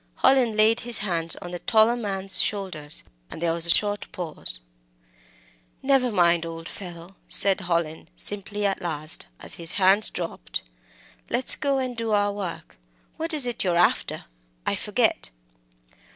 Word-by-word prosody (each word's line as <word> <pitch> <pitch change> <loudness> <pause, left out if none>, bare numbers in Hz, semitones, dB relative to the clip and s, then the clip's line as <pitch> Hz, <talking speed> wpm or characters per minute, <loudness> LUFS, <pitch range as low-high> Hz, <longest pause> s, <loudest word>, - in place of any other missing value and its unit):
Hallin 245 -5 +4
laid 220 +2 +4
his 240 -1 +2
hands 170 -5 +1
on 175 - -8
the 175 - -6
taller 230 +1 +3
man's 195 -4 +4
shoulders, 180 -8 -3 0.3
and - - -9
there 165 0 0
was 170 0 +5
a - - -6
short 205 +4 +3
pause. 155 - -4 1.2
"Never 265 -2 +2
mind, 170 -4 +3
old 165 0 -7
fellow," 175 0 -10
said 195 0 +3
Hallin, 170 -3 -2
simply, 205 0 -3
at 195 -1 -1
last, 155 -2 -1
as - - -1
his 165 - +1
hands 195 +2 +3
dropped; 165 - -5 0.7
"let's 260 - +4
go 280 -2 -1
and 255 -2 -3
do 230 -1 -4
our 205 0 +1
work. 195 - -7 0.4
What 325 +2 -2
is 300 -5 +2
it 240 -1 -2
you're 175 -3 0
after? 175 - +1 0.4
I - - 0
forget." - - 0
195 Hz, 150 wpm, -24 LUFS, 170-220 Hz, 1.2 s, was